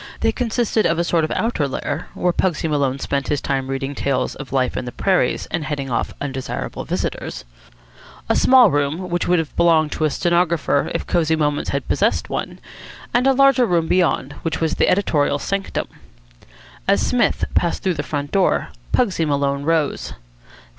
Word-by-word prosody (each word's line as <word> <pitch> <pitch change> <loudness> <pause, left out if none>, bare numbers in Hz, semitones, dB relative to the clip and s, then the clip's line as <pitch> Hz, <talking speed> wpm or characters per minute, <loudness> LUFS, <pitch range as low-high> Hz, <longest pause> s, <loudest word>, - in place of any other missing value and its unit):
They - - +3
consisted 230 -2 0
of 165 - 0
a 170 - +1
sort 170 -1 +1
of - - -5
outer 220 -11 0
lair, 145 +3 -4
where 180 -1 +1
Pugsy 170 -4 0
Maloney 140 -3 0
spent 140 0 -2
his 145 - 0
time 135 -1 -2
reading 135 +1 -3
tales 140 -1 -1
of 135 -1 -9
life 130 -2 0
in - - -3
the 125 - -5
prairies 190 +8 +1
and 165 - -1
heading 140 -3 -4
off 115 - -1
undesirable 135 -2 -4
visitors; - - -4 0.8
a - - +2
small 260 -1 +6
room, 145 +6 -1
which 175 - 0
would 180 - +3
have 160 -2 -3
belonged 160 -3 +3
to - - -5
the 155 -1 +2
stenographer 170 -2 +1
if - - -2
Cosy 160 -2 +1
Moments 150 -2 -1
had - - -2
possessed - - 0
one; - - -3 0.6
and 245 +2 +3
a 270 - +5
larger 275 -2 +4
room 170 -3 +1
beyond, 165 -6 +1
which 160 -1 -2
was 160 -1 0
the - - +2
editorial 155 -7 +2
sanctum. 195 +6 -3 1.0
As 200 +1 +4
Psmith 245 -1 +1
passed 170 - 0
through 185 - +1
the - - -3
front 145 -1 -4
door, 195 -2 +2 0.2
Pugsy 195 -9 +1
Maloney 140 -1 0
rose. 160 -2 0
160 Hz, 180 wpm, -20 LUFS, 140-180 Hz, 1.0 s, small